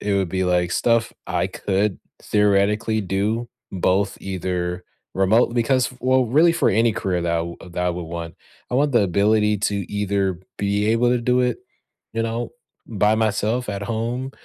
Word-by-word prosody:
it 100 -1 -1
would 95 -2 +1
be, 95 +1 0
like, 90 -1 +1
stuff 115 +2 +1
I - - 0
could 100 0 -1 0.2
theoretically 105 +2 +2
do, 105 +5 -1 0.2
both 95 +2 0
either 90 -1 -3 0.3
remote 105 +5 +3
because 125 +1 +1
well, 130 +1 +3
really 155 +8 +4
for 170 - +2
any 115 +3 +3
career 90 -3 -1
that 85 -1 0
I - - +2
w 85 0 -7
that 90 0 -4
I - - +2
would 90 0 -4
want. 85 -1 -6 0.4
I - - -2
want 140 +2 +2
the 120 -3 +4
ability 105 +3 +2
to 105 - -2 0.2
either 100 -3 0 0.2
be 100 +1 0
able 115 +2 +3
to 125 - +2
do 125 +1 +2
it, 125 -1 0 0.6
you 115 - 0
know, 115 +1 -3 0.3
by 105 -1 +2
myself 110 +2 0
at 100 -1 -3
home, 115 +5 -3
105 Hz, 175 wpm, -22 LUFS, 95-115 Hz, 0.6 s, really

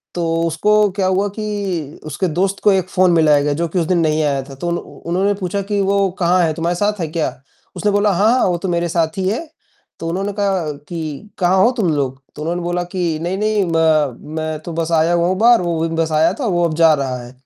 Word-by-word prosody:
तो 170 -1 -1 0.2
उसको 165 +6 0 0.3
क्या 190 - +1
हुआ 190 +2 +1
कि 195 -8 -4
उसके 180 +4 -2
दोस्त 195 +1 0
को 205 - +5
एक 185 -1 0
फ़ोन 185 -1 +3
मिलाया 150 -3 +4
गया, 145 0 0
जो 170 +3 -1
कि 180 +3 -1
उस 165 - 0
दिन 180 -2 +2
नहीं 155 -1 +1
आया 140 -2 0
था। 135 - -9
तो 175 +6 -5
उन्ह 170 - -1
उन्होंने 190 +4 -2
पूछा 195 +2 -2
कि 200 +1 -2
"वो 195 0 +2
कहाँ 180 +1 +3
है? 160 -1 +1
तुम्हारे 170 +1 -1
साथ 205 +2 0
है 165 - -1
क्या?" 160 0 -1 0.5
उसने 205 0 +1
बोला, 205 0 +2
"हाँ, 205 +6 +3
हाँ, 255 - +3
वो 175 -1 0
तो 185 +2 -4
मेरे 170 0 0
साथ 160 +1 0
ही 185 -1 -1
है।" 220 - -1 0.6
तो 165 - -4
उन्होंने 195 +3 -2
कहा 190 -6 0 0.2
कि 165 +3 -6
"कहाँ 185 +1 +3
हो 240 - +4
तुम 190 -7 +1
लोग?" 135 -1 -2
तो 150 - -8
उन्होंने 175 +2 -2
बोला 175 0 -1
कि 170 -4 0
नहीं, 185 +2 -2
नहीं 210 -1 +1
म 155 -6 +2 0.2
मैं 155 -1 -3
तो 170 - -5
बस 165 0 -2
आया 160 +2 +3
हुआ 170 0 +2
हूँ 185 0 0
बाहर, 235 -1 +5
वो 170 -2 -1
भी 165 - -4
बस 165 -1 0
आया 160 +3 +3
था, - - -1
वो 175 -3 +1
अब 160 - -1
जा 165 -2 +6
रहा 135 -3 -2
है। 120 - -12
175 Hz, 250 wpm, -18 LUFS, 160-195 Hz, 0.6 s, जा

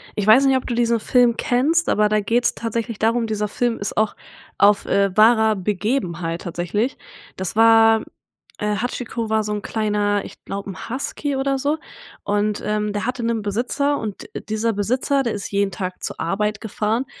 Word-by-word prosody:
ich 210 -1 -2
weiß 260 +6 +7
nicht, 270 - +4
ob 260 - -2
du 240 - -2
diesen 235 -1 +2
Film 245 0 +3
kennst, 300 +8 +1
aber 210 0 +3
da 215 0 +2
geht's 235 +4 +1
tatsächlich 230 -1 -4
darum 230 +1 +2
dieser 210 -1 -2
Film 240 +2 -1
ist 200 - -4
auch 215 -1 +1 0.4
auf, 205 0 +4
äh, 200 -1 +1
wahrer 220 0 +5
Begebenheit 185 -4 -2
tatsächlich. 180 - -2 0.4
Das 190 +1 -4
war 225 0 +6 0.6
äh, 210 0 0
Hachiko 230 -1 -3
war 220 0 +2
so 210 0 -3
'n 210 - -3
kleiner 205 -2 0
ich - - -13
glaube, 200 0 -5
'n 190 - -9
Husky 275 +3 -3
oder 270 0 0
so, 290 +3 0 0.5
und, 205 +1 0
ähm, 210 0 -1
der 205 - -2
hatte 250 -1 -3
'nen 230 -1 0
Besitzer 250 +8 0
und 210 -3 -6 0.2
dieser 220 +1 0
Besitzer, 255 +7 0
der 235 - -1
ist 205 - -5
jeden 200 -1 +1
Tag 185 0 -5
zur - - -5
Arbeit 210 +5 -1
gefahren, 220 +3 -1
220 Hz, 180 wpm, -21 LUFS, 205-240 Hz, 0.6 s, weiß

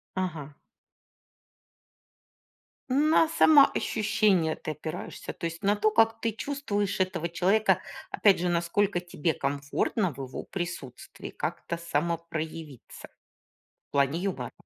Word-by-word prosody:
Ага. 160 -6 -4 2.3
На 305 +4 +4
самоощущение 215 - +4
ты 155 - -5
опираешься? 155 +3 -6
То 170 - -5
есть 165 +3 -6
на 205 +1 +2
то, 215 +1 +2
как 225 +1 +3
ты 225 -1 0
чувствуешь 210 -6 -2
этого 180 -3 0
человека. 195 +6 +2 0.3
Опять 200 -3 +4
же, 180 - 0
насколько 175 +3 +1
тебе 175 -3 -2
комфортно 140 +7 -1
в 135 - -16
его 130 - -7
присутствии 175 -9 -7
как-то 170 - -4
самопроявиться. 165 -3 -4 0.8
В - - -
плане 140 +3 +2
юмора. 175 -11 -3
175 Hz, 110 wpm, -28 LUFS, 160-210 Hz, 2.3 s, На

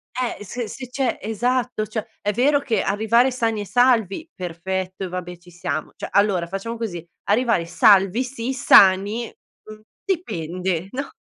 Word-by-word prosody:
Eh 250 -4 -3
se 240 +4 -5
se 255 +4 -8
c'è 260 -1 -1
esatto, 240 0 -1
cioè 215 0 -4 0.2
è 205 - 0
vero 280 +6 +3
che 235 -7 -1
arrivare 225 +5 +2
sani 225 -4 -1
e - - -5
salvi, 245 - +2
perfetto 185 +2 -4
e - - -4
vabbè 180 -1 -6
ci 175 0 -18
siamo. 155 -3 -4
Cioè, - - -7
allora 200 -4 +2
facciamo 195 +6 -5
così 190 -8 -5 0.2
arrivare 225 -4 +2
salvi 195 +6 +4
si, 250 0 -4
sani, 205 -1 +5 0.4
mhmm, 215 0 -12 0.2
dipende 180 - -2
no? 280 +2 -4
215 Hz, 155 wpm, -22 LUFS, 185-245 Hz, 0.4 s, sani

